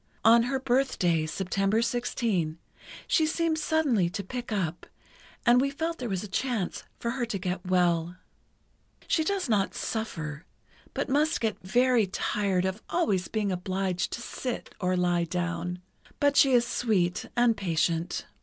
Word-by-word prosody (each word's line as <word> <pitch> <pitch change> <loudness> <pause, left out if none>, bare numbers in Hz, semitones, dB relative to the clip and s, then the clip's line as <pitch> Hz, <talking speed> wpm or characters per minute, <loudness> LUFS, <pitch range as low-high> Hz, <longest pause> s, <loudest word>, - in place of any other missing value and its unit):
On 230 +1 +8
her 265 +3 0
birthday, 240 -12 +1
September 195 +5 0
16, 220 -10 -1 0.5
she 315 -2 +3
seemed 320 0 0
suddenly 280 - +2
to 200 +3 -4
pick 245 +4 -6
up, 175 -5 -2 0.6
and 245 +1 +6
we 275 - +1
felt 325 +4 -3
there 245 -3 -3
was 190 -1 -2
a - - -6
chance 220 -1 -2
for 235 - -1
her 250 -1 -1
to 215 - -2
get 185 0 -4
well. 175 -2 +2 0.9
"She 320 - +2
does 385 0 -1
not 205 -4 +1
suffer, 165 -9 -4 0.5
but - - -1
must 295 +3 +2
get 225 -2 -1
very 240 +2 +3
tired 190 -1 0
of 190 +3 -2
always 205 - +1
being 210 -3 -1
obliged 185 0 -1
to 235 - -5
sit, 250 0 -5
or 185 0 +1
lie 175 -1 +2
down. 175 +1 -3 0.4
But 285 -1 +3
she 270 -2 +6
is 240 -1 +5
sweet 195 -8 0
and 240 -1 +4
patient. 165 -2 -1
205 Hz, 155 wpm, -28 LUFS, 180-250 Hz, 0.9 s, On